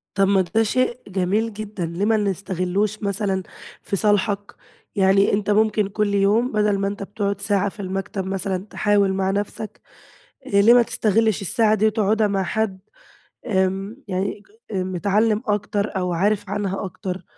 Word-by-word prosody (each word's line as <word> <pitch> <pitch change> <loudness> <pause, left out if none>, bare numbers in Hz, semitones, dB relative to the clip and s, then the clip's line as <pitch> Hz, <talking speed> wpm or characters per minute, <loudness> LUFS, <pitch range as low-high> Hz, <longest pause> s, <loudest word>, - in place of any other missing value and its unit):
طَب 195 -1 +3
ما 195 -1 +4
ده 200 +6 +1
شيء 250 +2 0
جميل 200 +4 0
جدًا، 205 -4 -5
ليه 170 +5 -2
ما 220 0 +3
نستغلّوش 195 +1 -1
مثلًا 195 -1 -1 0.4
في 200 - -3
صالحك؟ 205 0 0 0.4
يعني 195 0 +4
أنت 205 0 0
ممكن 210 -1 +3
كل 205 0 0
يوم 205 +5 +2
بَدَل 210 -2 +2
ما 195 - 0
أنت 200 0 -4
بتقعد 200 0 -3
ساعة 200 -1 +1
في 205 - -18
المكتب 195 0 -3
مثلًا 190 0 -2
تحاول 200 -2 +2
مع 190 0 0
نفسك، 205 +2 -4 0.6
آآ، - - -9
ليه 230 +4 +7
ما 245 - +7
تستغلّش 220 -2 +1
الساعة 215 +3 +2
دي 215 +1 +1
وتقعدها 215 0 +2
مع 195 -1 0
حد 195 0 -1 0.7
آمم 195 +1 0
يعني 195 +2 -2 0.3
ج - - -4
متعلّم 200 +4 +1
أكتر 205 0 -1
أو 180 -1 -1
عارف 200 +3 0
عنها 200 -1 -2
أكتر؟ 185 -1 -5
200 Hz, 160 wpm, -22 LUFS, 190-215 Hz, 0.7 s, ليه